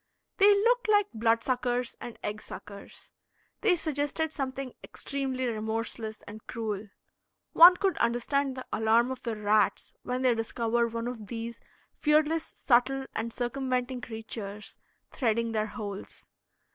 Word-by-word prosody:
They 405 0 +7
looked 465 +3 +3
like 415 -1 +3
blood 230 +1 +2
suckers 245 -1 -1
and 240 - -7
egg 210 +1 -3
suckers. 200 -1 -11 0.5
They 405 -5 +4
suggested 310 0 -2
something 265 -2 -4
extremely 265 -2 -3
remorseless 220 -1 -3
and 215 +1 -9
cruel. 215 -3 -4 0.6
One 355 +2 +10
could 380 -3 +1
understand 260 +3 +1
the 255 - -6
alarm 225 +3 +3
of 260 - -5
the 230 -2 -3
rats 210 -1 +1
when 250 +1 -2
they 250 -2 +5
discover 230 +1 0
one 230 +1 -4
of 230 -4 -6
these 230 +2 -5 0.3
fearless, 310 +1 +2
subtle, 265 +2 +2
and 230 +1 -3
circumventing 255 +1 -2
creatures 220 -3 -7 0.4
threading 230 -2 0
their 215 -1 0
holes. 205 -4 -7
240 Hz, 135 wpm, -29 LUFS, 225-275 Hz, 0.6 s, One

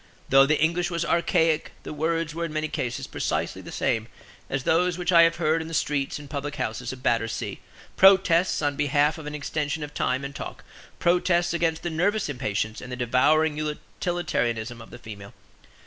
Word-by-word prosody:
Though 135 +1 +6
the 150 +1 +2
English 170 +2 +1
was 170 -1 -2
archaic, 165 -2 +1
the - - -6
words 160 +1 -1
were 170 +1 -2
in 165 - -5
many 155 0 -1
cases 135 -6 -3
precisely - - -2
the - - -10
same 110 0 -1 0.4
as 135 -1 -2
those 175 +3 +2
which 180 0 -1
I 170 -1 +8
have 165 0 +4
heard 160 -1 +1
in 160 - -6
the 165 - -4
streets 145 -2 -1
and 145 -1 -10
public 145 0 -4
houses 115 +2 -3
of 130 -1 -10
Battersea, 115 -3 -1 0.4
protests 185 -3 +5
on 145 -1 +1
behalf 145 +2 +2
of 150 - -8
an 150 - -5
extension 150 +1 -3
of 150 0 -7
time 130 +2 -1
and 140 - -6
talk, - - -7 0.3
protests 175 0 +2
against 165 -1 0
the 175 - -2
nervous 195 +4 0
impatience 110 -5 -2
and 125 - -9
the - - -3
devouring 145 +6 +2
utilitarianism 150 - -2
of 115 - -12
the - - -10
female. 100 -4 -10
150 Hz, 190 wpm, -25 LUFS, 130-170 Hz, 0.4 s, I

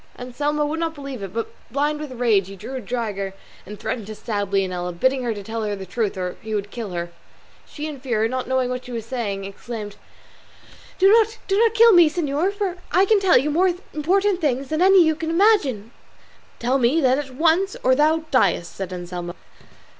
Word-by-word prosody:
Anselmo 290 +4 -2
would 310 +2 -3
not 330 -1 -2
believe 275 -5 -7
it, 195 -2 -6
but 230 +2 -3 0.2
blind 295 +4 0
with 300 -3 -6
rage 220 -6 +2
drew 255 - -8
a 260 - -4
dagger 200 -4 -3 0.3
and 210 0 -9
threatened 220 -5 -4
to 215 - -7
stab 205 -3 -3
Leonela, 185 -2 -1
bidding 260 +10 +1
her 240 -2 -1
tell 220 +2 -5
the 205 -3 -3
truth 200 +1 -2
or 180 -1 -4
he 220 0 -4
would 205 0 -3
kill 230 -4 -5
her. 170 -1 -4 0.6
She, 300 - -7
in 305 -2 -5
her - - -18
fear, 230 -5 0
not 255 +2 -3
knowing 260 -1 0
what 250 0 -4
she 250 - -9
was 230 -2 -4
saying, 210 -6 -3
exclaimed, 205 +1 -7 1.0
"Do 380 - +5
not 445 0 +3
kill 465 -1 +7
me, 345 -3 +7
señor, 310 +2 0
for 400 -3 -3
I 375 +2 +4
can 425 +1 +4
tell 385 -2 +5
you 285 +4 +1
things - - -3
more 360 +2 +3 0.2
important 375 +5 +1
than 285 +2 -1
any 380 -2 +6
you 315 - +3
can 320 +1 -4
imagine." 325 - +2 0.7
"Tell 255 +3 +1
me 255 +6 +3
then 260 -2 +3
at 270 -3 -7
once 335 +6 +2
or 260 - +4
thou 310 +4 +3
diest," 185 - +2
said 190 -2 -5
Anselmo. 175 -1 -6
255 Hz, 200 wpm, -22 LUFS, 210-320 Hz, 1.0 s, kill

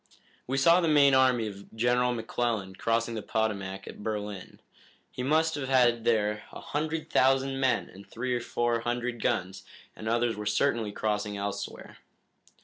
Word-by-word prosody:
"We 135 +2 -1
saw 170 +6 +5
the 170 - +1
main 145 -3 +5
army 130 -3 +4
of 100 0 -9
General 120 +2 +2
McClellan 115 -4 -2
crossing 115 +2 0
the 110 - -3
Potomac 100 -3 -2
at - - -9
Berlin. 105 -3 -5 0.5
He - - -6
must 160 +5 +2
have 135 -3 -4
had 120 -3 +3
there 105 -2 +1
a - - -9
hundred 155 +1 -3
thousand 135 +1 +3
men 130 -1 +1
and 100 +1 -14
three 125 +2 -3
or 120 - -1
four 120 0 0
hundred 120 0 -3
guns, 95 -5 -1 0.3
and 110 - -5
others 120 0 +1
were 105 0 -5
certainly 115 -1 +1
crossing 105 -1 -2
elsewhere." 100 0 -5
120 Hz, 160 wpm, -28 LUFS, 105-130 Hz, 0.5 s, saw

